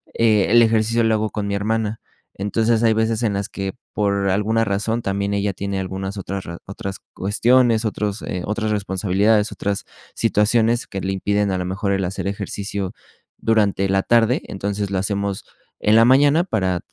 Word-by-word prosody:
eh, 110 -3 +3
el 120 +1 +6
ejercicio 115 +1 +2
lo 110 0 +3
hago 110 0 -1
con 105 -2 -4
mi 100 - -2
hermana, 110 +1 -1 0.4
entonces, 110 +3 +1
hay 115 -1 +4
veces 110 0 0
en 105 - +1
las 100 +2 -3
que, 95 -1 -4 0.2
por 100 -1 0
alguna 105 +4 +1
razón, 110 +3 -1
también 100 -1 -1
ella 100 0 0
tiene 100 +1 -3
algunas 95 +1 -4
otras 95 0 -5
razo 85 0 -8
otras 95 0 -6
cuestiones, 115 +3 +2
otros, 105 -1 -2
eh, 90 -2 -4
otras 110 +1 -2
responsabilidades, 105 +1 +1
otras 100 -1 -3 0.3
situaciones 115 +3 +2
que 95 - -5
le 95 +1 -2
impiden 100 +1 0
a 95 - 0
lo 90 - -3
mejor 100 +2 -2
el 95 -1 0
hacer 95 +2 -4
ejercicio 100 -1 -4 0.4
durante 100 -3 +1
la 95 0 +2
tarde, 115 +1 +3
entonces 100 +1 -3
lo 95 - 0
hacemos 100 0 -2 0.4
en 105 - +4
la 115 - +7
mañana 145 +6 +5
para 95 - 0
105 Hz, 175 wpm, -21 LUFS, 95-110 Hz, 0.4 s, la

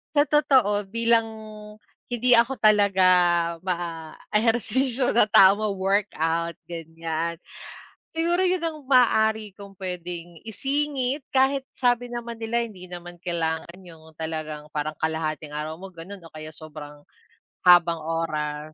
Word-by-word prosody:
Sa 290 - +6
totoo, 255 -9 +2
bilang, 230 +2 +2 0.8
hindi 245 +1 0
ako 235 +3 +3
talaga 205 -3 +4 0.6
ma-ehersisyo 210 - -1
sa 220 -2 +4
tao 195 -1 +6
ma-work 200 -1 0
out 165 +1 -1
ganiyan, 165 0 -4 0.8
siguro 335 +2 +1
iyon 365 -1 0
ang 325 -2 -3
maaari 220 -4 +3
kong 200 -1 -11
puwedeng 175 -2 -7
isingit 275 +3 -2
kahit 265 0 +2
sabi 245 -1 +1
naman 235 -1 -6
nila 230 +1 -1
hindi 185 -5 -12
naman 175 0 -9
kailangan 170 0 -3
yung 160 -3 -15
talagang 155 -2 -5
parang 155 +1 -2
kalahating 155 -1 -2
araw 155 +1 -4
mo 195 - -8
gano'n 185 +2 -10
o 165 - -13
kaya 155 0 -9
sobrang 150 -2 -11 0.6
habang 175 -2 +5
oras. 155 -2 -3
190 Hz, 120 wpm, -24 LUFS, 165-235 Hz, 0.8 s, Sa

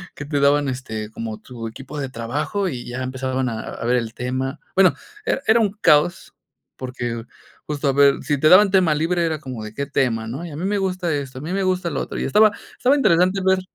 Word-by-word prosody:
Que 145 - -7
te 145 0 -1
daban, 140 +1 +3
este, 110 -5 -4
como 110 -1 -6
tu 120 -3 -8
equipo 135 +6 -9
de 135 -2 -3
trabajo, 140 - -2
y 125 -6 -6
ya 120 +1 -5
empezaban 130 0 -2
a 110 -2 -4
a - - -7
ver 120 +1 +2
el 115 -2 -2
tema. 130 +2 -3 0.2
Bueno, 190 -1 +5 0.3
era - - 0
era 220 +2 +5
un 205 -3 +2
caos, 150 +4 +3 0.4
porque 120 -3 -5 0.4
justo 150 -1 -2
a 135 - +3
ver, 140 0 +4
si 145 +1 0
te 155 - +4
daban 195 +2 +7
tema 185 -5 +4
libre 170 +3 0
era 160 -2 -1
como 130 -6 -7
de 105 0 -8
qué 140 +5 -3
tema, 120 -5 0
¿no? 135 +9 -5
Y - - -7
a 145 - -7
mí 175 - -3
me 205 +1 0
gusta 185 -3 -1
esto, 135 -2 -5
a - - -9
mí 160 +5 -4
me 195 0 0
gusta 185 -2 0
lo - - -2
otro, - - -5
y - - -1
estaba 215 0 +5 0.3
estaba 260 +3 +3
interesante 185 -5 +3
ver, 190 0 +3
140 Hz, 235 wpm, -21 LUFS, 125-180 Hz, 0.4 s, daban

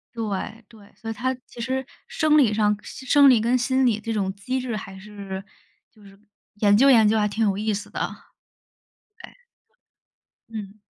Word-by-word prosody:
对 220 +1 -4
对， 210 -3 -18
所 225 - -8
以 - - -3
他 255 +3 -1
其 - - -15
实 260 +3 -2 0.2
生 305 -1 +2
理 250 -8 +4
上 210 -1 +2
生 275 +4 +3
理 240 -4 +5
跟 240 +3 +2
心 260 +1 +1
理 225 -3 +2
这 225 +1 -4
种 195 -3 -1
机 255 +7 -3
制 245 -3 -4
还 195 -2 -9
是 195 -1 -8 0.5
就 215 - -23
是 195 0 -16 0.4
研 205 -1 +5
究 270 +5 +6
研 225 -5 +6
究 220 +1 +2
还 210 - +2
挺 215 +2 -1
有 195 -2 0
意 215 +1 -1
思 200 0 -5
的。 - - -5 1.3
哎。 - - -11 1.2
嗯。 210 -3 -7
220 Hz, 195 characters per minute, -23 LUFS, 205-250 Hz, 1.3 s, 究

